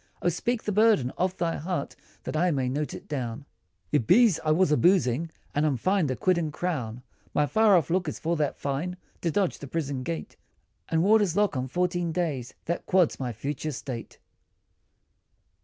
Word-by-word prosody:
O - - +4
speak 230 +7 -1
the 210 - -1
burden 210 - +4
of 185 0 -1
thy 170 -1 -1
heart, 165 -2 -3 0.3
That - - -5
I 175 +4 +3
may 135 -5 0
note 145 +3 -2
it - - -10
down," 130 -2 -4 0.5
"It 145 -7 +1
be's 215 -2 +5
I 155 - 0
was 155 +1 +3
a - - +5
boozin', 165 -4 +3 0.2
and 145 - +1
I'm 145 -4 +2
fined 185 - +1
a 130 - 0
quid 185 +3 +2
and 155 -3 -2
crown, 125 -9 -3 0.3
My 150 - +4
far 215 +3 +5
off 165 -1 0
look, 180 -1 +1
is - - -5
for 170 +1 -1
that 150 -2 -1
fine, 150 +6 -3 0.2
To 170 - 0
dodge 190 +2 0
the 140 - -8
prison 140 -3 -2
gate, 80 -11 -5 0.5
And 165 0 +2
warders' 205 -3 +4
lock 205 -6 +2
on 130 0 -2
fourteen 175 +3 0
days, 155 -8 -2
That 170 - -3
quads 185 -4 +3
my 125 -2 -2
future 140 +6 -4
state. 125 -3 -7
160 Hz, 190 wpm, -27 LUFS, 140-180 Hz, 0.5 s, be's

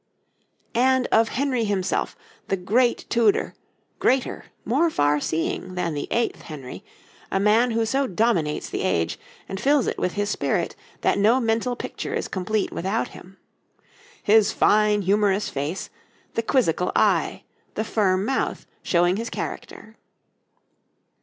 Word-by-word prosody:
And 260 +1 +3
of 225 0 +4
Henry 260 -3 0
himself, 195 -3 -1 0.3
the 195 - 0
great 235 +7 +1
Tudor, 230 -3 +2 0.5
greater, 260 -1 +1 0.2
more 290 +9 +2
farseeing 155 - 0
than 175 -3 -1
the 145 - -4
eighth 235 0 -1
Henry, 140 -5 -9 0.5
a 195 - 0
man 215 +5 +4
who 225 -1 +1
so 270 +4 0
dominates 180 -7 0
the - - -4
age, 80 0 0 0.3
and 195 - -5
fills 285 -2 +3
it - - -2
with 180 - -1
his 205 0 -1
spirit, - - -1 0.3
that - - +2
no 225 +6 +4
mental 230 +1 0
picture - - -5
is - - -2
complete 200 +2 -1
without 195 +6 -2
him. 190 +2 -14 0.9
His 215 0 +5
fine, 210 -1 +3
humorous 200 +1 +2
face, 145 +6 -4 0.4
the - - 0
quizzical 200 - +1
eye, - - +2 0.3
the 220 - -1
firm 195 -3 +1
mouth, 265 +3 -1 0.2
showing 175 +1 +2
his 230 +2 -3
character. - - -7
210 Hz, 135 wpm, -24 LUFS, 185-235 Hz, 0.9 s, His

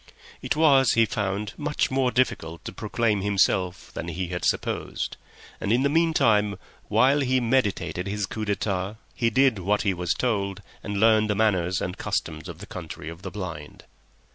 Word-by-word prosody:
It - - -1
was, 140 -5 +5
he 115 0 +5
found, 100 -1 -2
much 150 -2 -1
more 130 -1 +2
difficult 85 -10 -1
to - - -4
proclaim 110 -4 0
himself 95 -2 +1
than - - -5
he 85 +1 -3
had 90 0 -4
supposed, - - -1 0.4
and 100 - -1
in 120 +3 +3
the 140 - +3
meantime, 110 - +3 0.3
while 135 +3 +4
he 130 -2 +2
meditated 115 -6 0
his 105 0 -1
coup 110 +5 -5
d'etat, 100 -1 -1 0.2
he 115 - +1
did 130 -2 +3
what 100 +3 +1
he 100 -2 +2
was 90 -2 -1
told 100 -6 -1 0.2
and 100 -1 -3
learnt 110 0 +5
the 105 - 0
manners 95 -4 +1
and 90 +1 -4
customs 80 +2 -3
of 85 - -8
the 100 - -9
Country 90 -6 -7
of 85 +1 -10
the 95 - -5
Blind. 85 -7 -7
105 Hz, 175 wpm, -25 LUFS, 90-120 Hz, 0.4 s, was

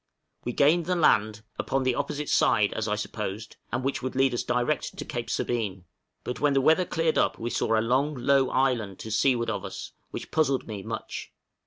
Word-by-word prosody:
We 120 - -1
gained 155 +6 +3
the 180 - +1
land 110 -10 +3 0.2
upon 135 0 0
the 130 -1 +2
opposite 145 +3 -3
side, 105 -3 +3
as 110 0 -2
I 105 - +1
supposed 105 0 -5
and 120 +1 -1
which 135 +1 -1
would 130 0 -4
lead 135 -1 +3
us 120 - 0
direct 125 +5 -1
to - - -5
Cape 120 -5 -4
Sabine; 100 -9 -2 0.4
but 125 - -4
when 145 -1 +3
the - - +5
weather 160 +6 +4
cleared 165 -2 +1
up - - +2
we 120 +1 -4
saw 115 - +1
a - - +3
long 135 +5 +1
low 135 +1 +3
island 120 -8 +1
to 110 - -6
seaward 115 +2 +2
of - - -3
us, - - -7 0.2
which - - -7
puzzled 145 -4 +1
me 105 -3 -6
much. - - -6
125 Hz, 205 wpm, -27 LUFS, 110-140 Hz, 0.4 s, the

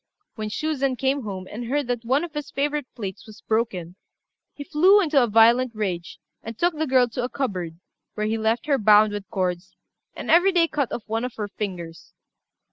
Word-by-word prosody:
When 215 -1 -5
Shuzen 275 +1 -1
came 270 +3 0
home, 190 -4 -6
and 235 +3 -6
heard 285 +4 -1
that 240 -1 -3
one 265 +6 +1
of 340 -3 -7
his 295 -1 -5
favourite 290 -1 -2
plates 195 -3 -7
was 215 0 -13
broken, 190 -6 -2 0.5
he 285 - -8
flew 360 +8 +5
into 305 -8 +3
a 240 - +2
violent 230 +2 +4
rage, 185 -5 -3 0.2
and 225 0 -8
took 350 0 +2
the 315 +1 -2
girl 255 -2 +4
to 245 +2 -4
a 245 - -2
cupboard, 180 -13 -3 0.4
where 215 - -2
he 220 +1 -1
left 220 +2 0
her 285 -2 +2
bound 210 0 +5
with 205 -1 -6
cords, 180 -1 -3 0.4
and - - -3
every 355 +4 +6
day 340 -2 +4
cut 285 -6 -2
off 235 - -4
one 225 +1 -2
of 250 -1 -5
her 210 -2 -4
fingers. 180 -6 -7
230 Hz, 205 wpm, -24 LUFS, 210-280 Hz, 0.5 s, every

